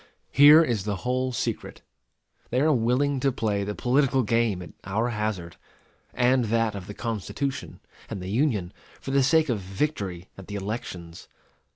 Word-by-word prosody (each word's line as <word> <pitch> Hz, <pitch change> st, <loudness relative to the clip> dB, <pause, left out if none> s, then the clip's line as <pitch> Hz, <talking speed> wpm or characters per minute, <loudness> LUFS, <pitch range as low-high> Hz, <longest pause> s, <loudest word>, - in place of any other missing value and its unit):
Here 150 Hz, +4 st, +8 dB
is 115 Hz, -10 st, -1 dB
the 105 Hz, -1 st, -1 dB
whole 130 Hz, +1 st, 0 dB
secret. 120 Hz, -, -4 dB, 0.7 s
They 125 Hz, -, +1 dB
are 155 Hz, +2 st, +4 dB
willing 130 Hz, +3 st, +1 dB
to 135 Hz, +1 st, +2 dB
play 105 Hz, -4 st, -1 dB
the 105 Hz, +1 st, -4 dB
political 135 Hz, +1 st, +2 dB
game 110 Hz, -4 st, +1 dB
at -, -, -11 dB
our 110 Hz, +6 st, -1 dB
hazard, 105 Hz, -8 st, -3 dB, 0.5 s
and 125 Hz, 0 st, +2 dB
that 115 Hz, 0 st, +1 dB
of 95 Hz, -2 st, -7 dB
the 105 Hz, -, -8 dB
Constitution 115 Hz, +4 st, -4 dB, 0.3 s
and -, -, -5 dB
the 90 Hz, +1 st, -5 dB
Union, 110 Hz, -, 0 dB, 0.3 s
for 135 Hz, -, -6 dB
the 140 Hz, 0 st, +4 dB
sake 160 Hz, +3 st, +4 dB
of 120 Hz, -6 st, 0 dB
victory 95 Hz, -, -3 dB
at 95 Hz, -, -11 dB
the 105 Hz, -, -6 dB
elections. 95 Hz, -5 st, -6 dB
115 Hz, 165 wpm, -26 LUFS, 100-130 Hz, 0.7 s, Here